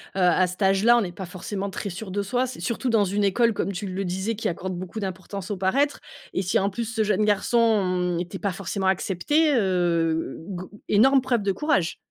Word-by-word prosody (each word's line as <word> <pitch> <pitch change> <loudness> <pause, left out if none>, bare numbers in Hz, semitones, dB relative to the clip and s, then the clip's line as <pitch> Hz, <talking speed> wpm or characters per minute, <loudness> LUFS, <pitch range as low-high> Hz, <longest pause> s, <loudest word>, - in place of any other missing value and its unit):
à 180 0 +3
cet 180 +3 -8
âge-là, 200 +5 +5
on - - +3
n'est 180 -3 -3
pas 175 +1 -7
forcément 195 +2 -5
très 200 0 -5
sûr 195 +3 -7
de 200 +2 -2
soi, 250 +5 0
c'est 255 - -8
surtout 245 +2 -2
dans 215 -3 +3
une 200 +2 0
école, 230 +3 +3
comme 200 - -2
tu 200 +2 -5
le 190 +1 -3
disais, 190 +5 -2
qui 220 - -2
accorde 185 +2 -4
beaucoup 185 +4 -6
d'importance 190 0 -5
au 200 - -2
paraître. 275 +11 +1 0.3
Et 185 - 0
si, 180 - +1
en 195 +1 +1
plus, 235 +3 -3
ce 225 -2 +1
jeune 210 0 +1
garçon 195 -5 +2
était 180 +2 -5
pas 200 - -1
forcément 195 +1 -3
accepté, 245 - +2
heu, 170 -5 +1
g 185 -1 -5 0.2
énorme 265 +6 +5
preuve 240 -5 0
de 195 - +1
courage. 195 - 0
195 Hz, 215 wpm, -25 LUFS, 185-225 Hz, 0.3 s, âge-là